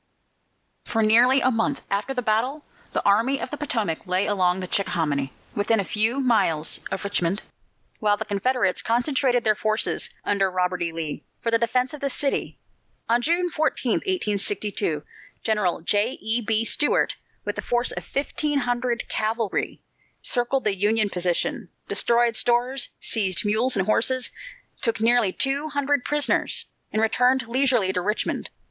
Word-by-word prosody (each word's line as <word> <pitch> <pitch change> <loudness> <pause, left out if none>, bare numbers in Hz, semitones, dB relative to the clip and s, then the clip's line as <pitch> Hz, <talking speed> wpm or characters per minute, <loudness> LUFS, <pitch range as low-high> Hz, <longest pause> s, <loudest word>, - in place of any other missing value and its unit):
For 225 -1 0
nearly 245 +5 +5
a 255 - +3
month 235 +4 -1
after 200 +6 -1
this 250 -2 -3
battle, 250 +8 0 0.3
the - - -2
Army 230 +7 +3
of - - -5
the - - -3
Potomac 220 - -2
lay 185 +2 +1
along 185 -3 +1
the 185 - -5
Chickahominy, 150 -8 -1 0.2
within 210 +2 +1
a - - +1
few 220 +7 0
miles 200 - +1
of 190 - -4
Richmond, 200 -1 -1 0.6
while 205 -1 +2
the 220 - -4
Confederates 210 0 0
concentrated 245 +1 +1
their 215 - +4
forces, 215 +1 0 0.2
under 195 -1 +2
Robert 180 -1 -1
E. 170 -1 -1
Lee, 160 -2 -5 0.2
for 230 - -1
the 230 - +3
defence 250 +3 0
of 300 - -8
the 280 - 0
city. 275 +1 -2 0.5
On 235 +1 +2
June 345 +5 +1
14, 295 -6 0
1862, 205 - -1 0.4
General 210 -7 0
J. 205 +8 +1
E. 225 +3 -1
B. 220 0 0
Stuart, 295 - +2 0.3
with - - -3
a - - -1
force 245 0 0
of - - -5
fifteen 290 +1 -1
hundred 245 -1 -1
cavalry, 220 -1 -2 0.4
circled 250 +2 +2
the 205 -2 +1
Union 210 +1 +1
position, 180 -1 -1 0.2
destroyed 235 -1 +2
stores, 245 +3 +2
seized 205 -2 +1
mules 220 +4 +2
and 190 - +1
horses, 255 +4 +2 0.5
took 230 -2 0
nearly 230 -3 +4
two 275 +8 0
hundred 285 -2 0
prisoners, 295 -1 +2 0.3
and 215 - +1
returned 250 +2 +2
leisurely 245 -6 +2
to 180 - -1
Richmond. 210 +4 -2
225 Hz, 155 wpm, -24 LUFS, 200-255 Hz, 0.6 s, nearly